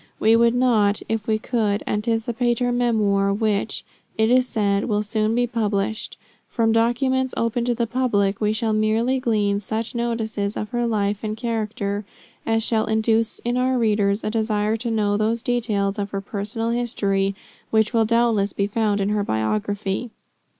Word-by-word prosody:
We 220 +1 +5
would 235 +1 +4
not, 220 -5 +2
if 225 -2 -2
we 220 -1 +2
could, 215 -3 -1
anticipate 230 +2 0
her 245 0 0
memoir, 215 -5 +2
which, 210 0 -1 0.3
it 220 +1 +3
is 255 0 +4
said, 200 -3 0
will 210 -2 0
soon 215 +1 0
be 245 0 +2
published. 220 -2 -2 0.3
From 225 -2 +1
documents 255 +3 +1
open 230 +1 0
to 245 -1 +1
the 235 - 0
public, 220 -5 0
we 210 0 +2
shall 220 0 0
merely 220 +4 +1
glean 210 -4 +1
such 220 +3 -3
notices 220 -4 -2
of 210 - -4
her 240 -1 -1
life 205 -2 0
and 215 0 -3
character 215 -3 -2 0.4
as 225 0 +2
shall 220 -1 +1
induce 220 +1 +1
in 240 +1 0
our 255 0 +1
readers 210 -3 +1
a 215 - -1
desire 215 -1 0
to 235 +1 -3
know 210 -2 +1
those 225 +2 0
details 215 -5 0
of 200 0 -2
her 195 0 -4
personal 210 +3 -3
history 200 -5 0 0.3
which 220 +1 +2
will 225 -1 +4
doubtless 230 -3 +2
be 200 - 0
found 205 -1 0
in 195 - 0
her 210 -1 0
biography. 190 - -2
220 Hz, 170 wpm, -22 LUFS, 205-235 Hz, 0.4 s, We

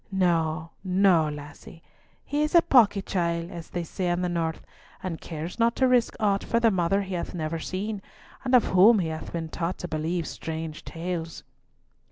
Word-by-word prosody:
No, 165 -4 +1
no, 185 -4 +3
lassie; 150 +2 -10 0.4
he 290 +1 -1
is 305 +3 0
a 340 - +8
pawky 205 -6 +4
chiel, 170 -2 -1
as 170 -2 -8
they 175 - -3
say 180 +2 -3
in 175 +1 0
the 180 - 0
north, 165 -2 -2 0.4
and 180 -3 -4
cares 165 +5 -6
not 230 0 +3
to 260 - +3
risk 250 -2 +3
aught 200 -2 +1
for 230 - +1
the 230 -1 +4
mother 190 +2 +1
he 190 -1 -6
hath 180 +1 -4
never 160 0 -2
seen, 200 +5 -4 0.4
and 255 -1 +3
of 245 - +5
whom 205 +5 +7
he 170 -5 0
hath 160 0 -6
been 165 -1 -4
taught 170 +2 -3
to 175 - -5
believe 160 +2 -2
strange 160 -1 -6
tales." 165 -1 -5
175 Hz, 190 wpm, -26 LUFS, 165-200 Hz, 0.4 s, a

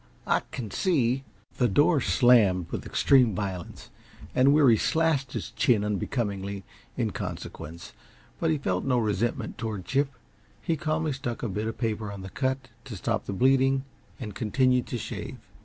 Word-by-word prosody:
I - - +3
can 110 -5 -6
see 135 -8 +1 0.2
" - - -31
The 125 - +4
door 145 - +3
slammed 105 - +4
with - - -4
extreme 125 -7 +4
violence, 95 -3 -5 0.4
and 130 +2 +5
Weary 140 -6 +6
slashed 145 +1 +1
his - - -4
chin 115 -7 +2
unbecomingly 100 -1 -2 0.3
in - - 0
consequence, 85 +3 -7 0.5
but 165 - +1
he 155 - +2
felt 95 -10 -1
no 130 -2 +1
resentment 110 +1 -1
toward 110 -5 -4
Chip. 140 +1 +1 0.5
He 165 - -1
calmly 155 0 -1
stuck 130 -3 -5
a - - 0
bit 105 +3 -2
of 115 - -4
paper 110 -3 -2
on 100 -2 -8
the 95 - -8
cut 130 -1 -2 0.2
to - - -7
stop - - -2
the - - -2
bleeding 135 +4 +3 0.4
and 110 -5 -6
continued 125 +4 +1
to 120 - -3
shave. - - -6
120 Hz, 165 wpm, -27 LUFS, 105-135 Hz, 0.5 s, Weary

